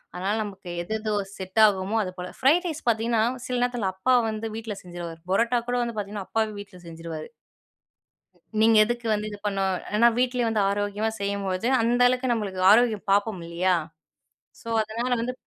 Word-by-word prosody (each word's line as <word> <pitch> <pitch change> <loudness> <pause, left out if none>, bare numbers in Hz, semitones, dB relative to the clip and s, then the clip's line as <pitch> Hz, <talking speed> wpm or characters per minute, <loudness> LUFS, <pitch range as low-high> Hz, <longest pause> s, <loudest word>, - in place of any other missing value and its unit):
அதனால 195 +4 -1
நமக்கு 195 -3 -8
எது 175 +6 -5
எதோ 215 -1 -2 0.2
செட் 190 +3 -3
ஆகுமோ 195 +2 -1
அது 185 - -5
போல 180 0 -5
ஃப்ரைட் 320 +8 +4
ரைஸ் 315 -4 -5
பார்த்திங்கன்னா, 225 0 +2 0.2
சில 250 -1 -2
நேரத்தில 245 -6 0
அப்பா 255 +7 +2 0.2
வந்து 215 +1 -4
வீட்ல 225 -2 -5
செஞ்சுருவாரு. 175 -2 -7
புரோட்டா 235 +4 +2
கூட 245 - +1
வந்து 235 -1 -4
பார்த்திங்கன்னா 200 -1 -5
அப்பாவே 220 -1 0
வீட்ல 195 -3 -11
செஞ்சுருவாரு. 165 -1 -7 1.3
நீங்க 225 0 +6
எதுக்கு 240 +1 -3
வந்து 210 0 -2
இது 205 - -8
பண்ணு, 195 -1 0 0.3
ஏனா 235 +2 +6
வீட்டிலயே 250 -2 +1
வந்து 215 -2 +1
ஆரோக்கியமா 205 +2 -1
செய்யும்போது 200 +1 -1
அந்த 240 +2 +2
அளவுக்கு 255 0 +1
நம்மளுக்கு 200 -5 -2
ஆரோக்கியம் 220 -3 +3
பார்ப்போம் 205 -1 +2
இல்லீயா. 175 +2 +1 0.9
ஸோ - - -13
அதனால 230 +4 -3
வந்து 250 +2 -2
215 Hz, 165 wpm, -25 LUFS, 190-235 Hz, 1.3 s, நீங்க